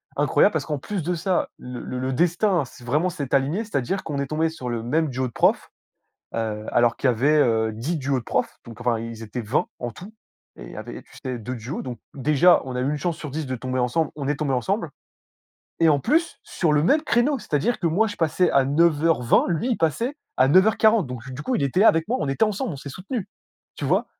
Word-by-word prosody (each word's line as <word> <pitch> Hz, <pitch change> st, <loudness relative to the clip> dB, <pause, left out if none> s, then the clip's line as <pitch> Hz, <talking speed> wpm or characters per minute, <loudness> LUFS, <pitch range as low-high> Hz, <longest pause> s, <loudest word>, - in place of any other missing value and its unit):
incroyable -, -, +3 dB
parce -, -, -1 dB
qu'en 150 Hz, -2 st, -3 dB
plus 190 Hz, +3 st, -4 dB
de 180 Hz, +3 st, -1 dB
ça, 180 Hz, +2 st, 0 dB
le 125 Hz, -1 st, -8 dB, 0.2 s
le 130 Hz, +1 st, -2 dB
destin 175 Hz, -, +2 dB
s'est 125 Hz, 0 st, -15 dB
vraiment 150 Hz, +9 st, +1 dB
s'est 145 Hz, -7 st, -5 dB
aligné. 145 Hz, +11 st, +1 dB
C'est-à-dire 190 Hz, -, -2 dB
qu'on 145 Hz, -3 st, -4 dB
est 140 Hz, -, -2 dB
tombés 155 Hz, +3 st, 0 dB
sur 130 Hz, -6 st, -6 dB
le 115 Hz, -1 st, -3 dB
même 155 Hz, +5 st, +1 dB
duo 130 Hz, 0 st, -2 dB
de 120 Hz, -, -9 dB
profs, -, -, +2 dB, 0.7 s
heu, 110 Hz, -1 st, -3 dB
alors 120 Hz, -1 st, +3 dB
qu'il -, -, 0 dB
y -, -, +3 dB
avait, 145 Hz, +7 st, +3 dB
heu, 110 Hz, -4 st, +2 dB
10 140 Hz, +10 st, -3 dB
duos 135 Hz, -2 st, 0 dB
de 115 Hz, -, -11 dB
profs. -, -, -2 dB
Donc 115 Hz, -1 st, -11 dB
enfin, 120 Hz, -2 st, +1 dB
ils 115 Hz, 0 st, -7 dB
étaient 115 Hz, +3 st, -5 dB
20 120 Hz, +10 st, 0 dB
en 120 Hz, -1 st, -4 dB
tout 190 Hz, -, -12 dB, 0.4 s
et -, -, -9 dB
il -, -, -11 dB
y -, -, -11 dB
avait, -, -, -7 dB
tu -, -, -18 dB
sais, 130 Hz, -2 st, -3 dB
2 125 Hz, +3 st, -5 dB
duos. 120 Hz, +5 st, -5 dB
Donc 125 Hz, -4 st, -7 dB
déjà, 150 Hz, +5 st, +4 dB
on 130 Hz, -, -5 dB
a 125 Hz, -, -1 dB
eu 135 Hz, -, 0 dB
1 150 Hz, -, -1 dB
chance 170 Hz, +2 st, -2 dB
sur 150 Hz, -, -7 dB
10 155 Hz, +2 st, -4 dB
de 130 Hz, -, -3 dB
tomber 130 Hz, +1 st, -3 dB
ensemble, 145 Hz, +6 st, +1 dB
on 140 Hz, -2 st, -4 dB
est 145 Hz, -, +1 dB
tombés 145 Hz, -3 st, -1 dB
ensemble 125 Hz, -4 st, -1 dB, 0.9 s
et 165 Hz, -, +5 dB
en 145 Hz, -2 st, +4 dB
plus, 330 Hz, -, +1 dB
sur 165 Hz, -4 st, 0 dB
le 150 Hz, 0 st, +3 dB
même 300 Hz, -, +3 dB
créneau, 275 Hz, -1 st, +2 dB
c'est-à-dire 210 Hz, -, -1 dB
que 175 Hz, -, 0 dB
moi, 200 Hz, +8 st, +2 dB
je 205 Hz, -, -5 dB
passais 170 Hz, +2 st, +2 dB
à 135 Hz, -, +4 dB
09:20, 155 Hz, -2 st, +3 dB
lui 175 Hz, +9 st, -1 dB
il 235 Hz, -, +1 dB
passait 230 Hz, -, 0 dB, 0.2 s
à 130 Hz, -, +5 dB
09:40. 215 Hz, +2 st, +4 dB
Donc 125 Hz, 0 st, -7 dB
du 135 Hz, +4 st, -6 dB
coup, 255 Hz, -, -1 dB
il -, -, -1 dB
était 140 Hz, +7 st, 0 dB
là 225 Hz, -, +8 dB
avec 165 Hz, 0 st, +2 dB
moi, 250 Hz, -, +1 dB
on -, -, -1 dB
était 135 Hz, +11 st, +2 dB
ensemble, 215 Hz, +1 st, -2 dB
on 140 Hz, -, -6 dB
s'est 140 Hz, -, -8 dB
soutenus. 190 Hz, -, -5 dB, 0.5 s
Tu -, -, -5 dB
vois? -, -, +2 dB
145 Hz, 245 wpm, -23 LUFS, 125-180 Hz, 0.9 s, là